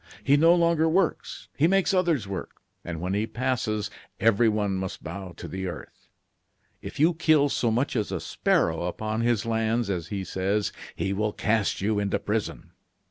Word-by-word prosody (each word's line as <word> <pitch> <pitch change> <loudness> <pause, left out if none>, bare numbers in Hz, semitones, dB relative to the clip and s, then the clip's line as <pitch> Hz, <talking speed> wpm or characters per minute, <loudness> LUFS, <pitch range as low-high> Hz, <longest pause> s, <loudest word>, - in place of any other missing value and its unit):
He 140 - +4
no 165 +4 +6
longer 170 -2 +3
works; 180 +1 -1
he 155 - +3
makes 195 +1 +2
others 170 - +1
work; 95 -1 -6 0.2
and 85 -2 -5
when 90 +3 -2
he 105 +2 0
passes, 110 -3 -1 0.3
everyone 105 -2 +2
must 95 -1 -5
bow 95 -3 -7
to - - -7
the 95 0 -4
earth. 90 - -9 0.7
If - - -8
you 165 +4 +5
kill 155 -3 +3
so 120 - +1
much 125 +6 0
as 110 -3 -1
a - - -2
sparrow 80 +1 0
upon 110 +5 -2
his 115 -2 +1
lands, 115 -1 0
as 85 -3 -3
he 100 0 -4
says, 100 +3 -1 0.2
he 95 - -1
will 105 +1 -1
cast 110 -3 0
you 105 +1 +1
into 100 -1 0
prison. 105 +1 -3
110 Hz, 175 wpm, -26 LUFS, 100-140 Hz, 0.7 s, no